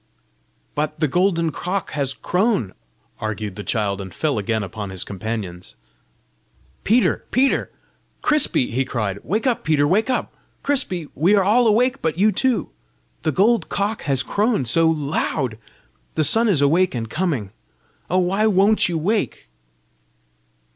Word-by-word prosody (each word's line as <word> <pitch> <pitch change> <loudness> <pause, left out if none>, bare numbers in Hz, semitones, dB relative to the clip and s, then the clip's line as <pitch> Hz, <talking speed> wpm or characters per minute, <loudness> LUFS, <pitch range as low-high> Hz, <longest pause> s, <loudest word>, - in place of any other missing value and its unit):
"But 150 +1 -2
the 155 - +2
golden 170 +1 +1
cock 185 +4 -3
has 140 -3 -2
crown!" 185 - 0 0.5
argued 110 -2 -4
the 105 - -6
child, 100 -4 -1
and 95 -1 -8
fell 145 - -1
again 110 +1 -1
upon 100 0 -6
his 95 -2 -3
companions. 100 -3 -6 1.1
"Peter! 235 +4 +2
Peter! 265 +2 +2 0.5
Crispy!" 300 - +2
he 130 +3 +1
cried. 105 -6 -3
"Wake 210 - -2
up, 250 -3 +1
Peter! 150 -2 +2
wake 215 - +2
up, 255 - -1 0.3
Crispy! 210 - 0
We 180 +8 +3
are 200 - +4
all 230 +5 +4
awake 250 +5 +2
but 160 0 -1
you 210 +3 +4
two! 260 +2 0 0.5
The 155 - 0
gold 220 - +2
cock 205 +2 -1
has 135 -2 0
crown 210 - 0
SO 165 +8 +3
loud! 145 -6 -1 0.6
The 155 - +2
sun 225 +10 +3
is 165 -9 +3
awake 170 +3 +3
and 115 -2 -3
coming! 140 - -2 0.6
Oh, 185 - +1
why 190 +4 +2
WON'T 205 0 +3
you 170 - -1
wake?" 205 +7 -1
165 Hz, 145 wpm, -21 LUFS, -, 1.1 s, are